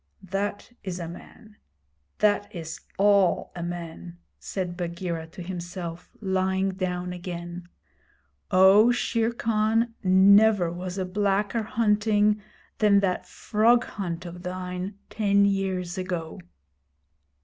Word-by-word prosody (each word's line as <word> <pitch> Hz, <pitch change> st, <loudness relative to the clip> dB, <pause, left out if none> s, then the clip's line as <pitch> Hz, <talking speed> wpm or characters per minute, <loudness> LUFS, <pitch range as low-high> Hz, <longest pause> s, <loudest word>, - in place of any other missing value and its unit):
'That 200 Hz, +4 st, -3 dB
is 185 Hz, -3 st, -4 dB
a 170 Hz, -, -4 dB
man. 210 Hz, +5 st, -13 dB, 0.6 s
That 205 Hz, -1 st, +2 dB
is 165 Hz, -1 st, -6 dB, 0.2 s
all 200 Hz, -2 st, +3 dB
a 175 Hz, -, -5 dB
man,' 170 Hz, 0 st, -6 dB, 0.2 s
said 180 Hz, -3 st, -4 dB
Bagheera 170 Hz, -2 st, -4 dB
to 175 Hz, +2 st, -9 dB
himself, 175 Hz, -1 st, -6 dB
lying 190 Hz, -1 st, 0 dB
down 180 Hz, -1 st, -3 dB
again. 175 Hz, 0 st, -7 dB, 0.8 s
'Oh, 195 Hz, +4 st, +6 dB
Shere 230 Hz, -1 st, 0 dB
Khan, 225 Hz, 0 st, +1 dB
never 195 Hz, 0 st, +5 dB
was 180 Hz, +2 st, -5 dB
a 190 Hz, -, -1 dB
blacker 200 Hz, +3 st, 0 dB
hunting 210 Hz, -1 st, +2 dB, 0.4 s
than 205 Hz, -2 st, +5 dB
that 185 Hz, -2 st, -1 dB
frog 235 Hz, +3 st, +2 dB
hunt 175 Hz, -3 st, -5 dB
of 175 Hz, 0 st, -8 dB
thine 180 Hz, +1 st, -5 dB, 0.2 s
ten 200 Hz, -2 st, +3 dB
years 190 Hz, -2 st, -1 dB
ago!' 175 Hz, -3 st, -4 dB
190 Hz, 115 wpm, -26 LUFS, 175-205 Hz, 0.8 s, Oh